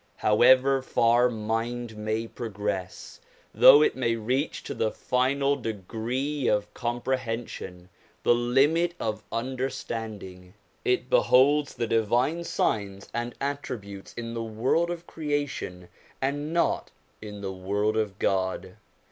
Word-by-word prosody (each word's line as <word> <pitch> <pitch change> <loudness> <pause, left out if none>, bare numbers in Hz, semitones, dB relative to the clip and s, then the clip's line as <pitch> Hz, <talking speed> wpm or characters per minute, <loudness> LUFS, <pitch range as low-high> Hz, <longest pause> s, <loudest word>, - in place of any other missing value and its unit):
However 130 +5 +5
far 120 -1 +3
mind 115 +1 -3
may 110 +1 -2
progress, 105 -5 -5 0.3
though 150 - +8
it - - +2
may 120 -3 0
reach 125 +6 -2
to - - -5
the 110 - 0
final 135 +5 +1
degree 120 +5 -3
of 105 -1 0
comprehension, 120 -6 -3 0.4
the - - +5
limit 140 +9 +2
of 110 -1 -2
understanding, 115 -6 -5 0.3
it 380 -2 +1
beholds 145 - +4
the 120 - -1
divine 120 +9 +1
signs 100 -10 -2
andj 120 0 -3
attributes 120 -8 -5
in 115 0 -5
the 115 - -3
world 115 +10 0
of 175 0 -5
creation, 145 - -3 0.3
and 145 +3 -2
not 170 0 +1 0.3
in 105 -1 -8
the' 95 -1 -4
world 100 +3 -1
of 105 -3 -1
God. 95 0 -1
120 Hz, 120 wpm, -27 LUFS, 105-135 Hz, 0.4 s, though